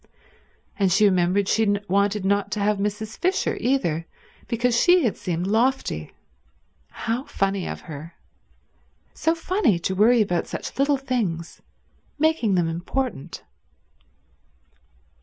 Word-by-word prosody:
And 195 Hz, -2 st, +3 dB
she 210 Hz, +4 st, +4 dB
remembered 185 Hz, +1 st, +2 dB
she 220 Hz, -, +2 dB
had 205 Hz, -1 st, 0 dB
wanted 200 Hz, +1 st, +1 dB
not 200 Hz, +1 st, +1 dB
to 210 Hz, -, -2 dB
have 205 Hz, 0 st, +1 dB
Mrs. 210 Hz, +2 st, -3 dB
Fisher 370 Hz, +2 st, 0 dB
either, 170 Hz, -, 0 dB, 0.4 s
because 235 Hz, +1 st, +1 dB
she 355 Hz, +7 st, +5 dB
had 230 Hz, -, +1 dB
seemed 175 Hz, 0 st, -3 dB
lofty. 220 Hz, -, 0 dB, 0.8 s
How 235 Hz, +4 st, -3 dB
funny 195 Hz, -1 st, -1 dB
of -, -, -6 dB
her. 155 Hz, +1 st, -9 dB, 1.0 s
So 325 Hz, +1 st, +1 dB
funny 330 Hz, -, +1 dB
to 170 Hz, +3 st, -2 dB
worry 220 Hz, +4 st, +5 dB
about 175 Hz, -4 st, -1 dB
such -, -, -6 dB
little 280 Hz, 0 st, +3 dB
things, 220 Hz, -11 st, -3 dB, 0.6 s
making 300 Hz, -10 st, +2 dB
them 175 Hz, -2 st, +2 dB
important. 175 Hz, -, -4 dB
205 Hz, 125 wpm, -24 LUFS, 180-250 Hz, 1.0 s, she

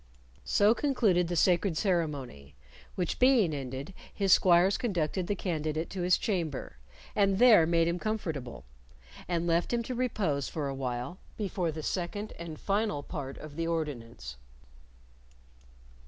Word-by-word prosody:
So 205 Hz, +2 st, +4 dB
concluded 225 Hz, -, +2 dB
the 175 Hz, -, -2 dB
sacred 175 Hz, 0 st, +2 dB
ceremony, 145 Hz, -, -2 dB, 0.4 s
which 180 Hz, -3 st, -2 dB
being 250 Hz, -, +4 dB
ended 135 Hz, +4 st, -5 dB, 0.2 s
his 195 Hz, -3 st, +3 dB
squires 180 Hz, +2 st, +5 dB
conducted 185 Hz, -4 st, -1 dB
the 205 Hz, -, 0 dB
candidate 160 Hz, -3 st, -2 dB
to 190 Hz, -, -4 dB
his 180 Hz, 0 st, +4 dB
chamber, 165 Hz, -, -3 dB, 0.4 s
and 195 Hz, -2 st, +3 dB
there 220 Hz, -8 st, +7 dB
made 165 Hz, 0 st, +3 dB
him 170 Hz, +1 st, -1 dB
comfortable, 160 Hz, -, -4 dB, 0.6 s
and 175 Hz, -1 st, -1 dB
left 170 Hz, 0 st, +1 dB
him 235 Hz, -1 st, 0 dB
to 255 Hz, -, -4 dB
repose 200 Hz, -, -1 dB
for 150 Hz, -3 st, -3 dB
a 135 Hz, -, -3 dB
while 130 Hz, +5 st, -4 dB, 0.2 s
before 190 Hz, -5 st, -1 dB
the 155 Hz, 0 st, -6 dB
second 200 Hz, +6 st, -3 dB
and 165 Hz, -2 st, -7 dB
final 200 Hz, -7 st, -1 dB
part 135 Hz, -2 st, -6 dB
of 150 Hz, -1 st, -10 dB
the 165 Hz, +1 st, -2 dB
ordinance. 120 Hz, -, -4 dB
170 Hz, 140 wpm, -30 LUFS, 150-200 Hz, 0.6 s, there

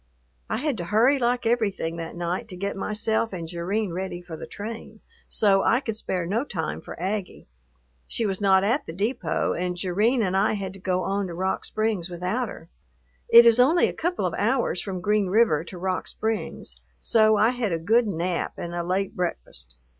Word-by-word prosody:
I -, -, 0 dB
had 280 Hz, -1 st, -1 dB
to 175 Hz, -, -4 dB
hurry 235 Hz, +9 st, +3 dB
like 245 Hz, 0 st, +1 dB
everything 205 Hz, -8 st, 0 dB
that 165 Hz, 0 st, -6 dB
night 175 Hz, +6 st, -3 dB
to 190 Hz, -, -8 dB
get 200 Hz, +2 st, -3 dB
myself 220 Hz, +3 st, -1 dB
and 170 Hz, -3 st, -5 dB
Jerrine 180 Hz, +3 st, -2 dB
ready 185 Hz, 0 st, -4 dB
for 175 Hz, -2 st, -9 dB
the -, -, -8 dB
train, 220 Hz, +1 st, -8 dB, 0.3 s
so 195 Hz, -2 st, +3 dB
I 235 Hz, -, +3 dB
could 225 Hz, -5 st, -4 dB
spare 185 Hz, -5 st, -3 dB
no 215 Hz, +8 st, 0 dB
time 165 Hz, -, -4 dB
for -, -, -9 dB
Aggie. 190 Hz, +1 st, -3 dB, 0.6 s
She 230 Hz, -, -2 dB
was 195 Hz, -1 st, -2 dB
not 190 Hz, -1 st, +5 dB
at 240 Hz, +8 st, +1 dB
the 160 Hz, -, -6 dB
depot, 215 Hz, +8 st, -1 dB
and 180 Hz, 0 st, -2 dB
Jerrine 210 Hz, +7 st, +1 dB
and 190 Hz, -1 st, 0 dB
I 200 Hz, +3 st, +3 dB
had 195 Hz, -3 st, -4 dB
to 195 Hz, -, -12 dB
go 185 Hz, 0 st, 0 dB
on 195 Hz, 0 st, -1 dB
to 170 Hz, -, -7 dB
Rock 190 Hz, +2 st, -1 dB
Springs 215 Hz, -5 st, -1 dB
without 185 Hz, +7 st, -2 dB
her. 165 Hz, -, -10 dB, 0.6 s
It 235 Hz, 0 st, +10 dB
is 235 Hz, +1 st, +6 dB
only 310 Hz, +8 st, +5 dB
a -, -, -4 dB
couple 350 Hz, +2 st, -1 dB
of -, -, -1 dB
hours -, -, +1 dB
from 185 Hz, -3 st, -5 dB
Green 210 Hz, +1 st, +2 dB
River 185 Hz, -6 st, +3 dB
to 180 Hz, -, -9 dB
Rock 185 Hz, +1 st, -2 dB
Springs, 220 Hz, -, -4 dB, 0.2 s
so 215 Hz, -, +4 dB
I 220 Hz, -, +5 dB
had 245 Hz, -5 st, -2 dB
a 165 Hz, -, +1 dB
good 220 Hz, +8 st, +3 dB
nap 175 Hz, -1 st, -2 dB
and 175 Hz, -, -5 dB
a 175 Hz, -, -1 dB
late 185 Hz, +3 st, -1 dB
breakfast. 60 Hz, -, -4 dB
195 Hz, 200 wpm, -25 LUFS, 180-225 Hz, 0.6 s, It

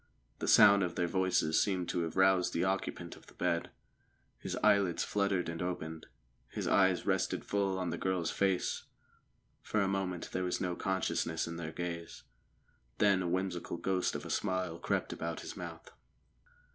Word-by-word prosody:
The -, -, -3 dB
sound 100 Hz, 0 st, +7 dB
of 90 Hz, -3 st, -1 dB
their 90 Hz, -, +1 dB
voices 90 Hz, -3 st, +2 dB
seemed 95 Hz, -3 st, 0 dB
to 90 Hz, -, 0 dB
have 80 Hz, -1 st, -3 dB
roused 95 Hz, -1 st, +4 dB
the 85 Hz, -, +1 dB
occupant 95 Hz, +1 st, -2 dB
of -, -, -18 dB
the -, -, -17 dB
bed. 85 Hz, 0 st, 0 dB, 0.7 s
His -, -, -4 dB
eyelids 100 Hz, -4 st, +3 dB
fluttered 100 Hz, -3 st, 0 dB
and 85 Hz, 0 st, -4 dB
opened; 80 Hz, -3 st, -4 dB, 0.4 s
his -, -, -4 dB
eyes 95 Hz, -2 st, +3 dB
rested 95 Hz, -1 st, 0 dB
full 100 Hz, -2 st, 0 dB
on 90 Hz, -2 st, -2 dB
the 85 Hz, -, -4 dB
girl's 90 Hz, -3 st, 0 dB
face. 95 Hz, -2 st, 0 dB, 0.8 s
For 110 Hz, -, -1 dB
a 100 Hz, -, +2 dB
moment 95 Hz, -3 st, -2 dB
there 95 Hz, -, -1 dB
was 90 Hz, -, -1 dB
no 90 Hz, -1 st, -1 dB
consciousness 85 Hz, -4 st, -1 dB
in 85 Hz, 0 st, -5 dB
their 80 Hz, -2 st, -5 dB
gaze; 85 Hz, -1 st, -5 dB, 0.7 s
then 100 Hz, -2 st, +4 dB
a 90 Hz, -, -1 dB
whimsical 90 Hz, -1 st, -2 dB
ghost 90 Hz, +1 st, 0 dB
of -, -, -5 dB
a -, -, -5 dB
smile 90 Hz, -3 st, -1 dB
crept -, -, -1 dB
about 85 Hz, 0 st, -4 dB
his -, -, -7 dB
mouth. -, -, -8 dB
90 Hz, 170 wpm, -33 LUFS, 85-95 Hz, 0.8 s, sound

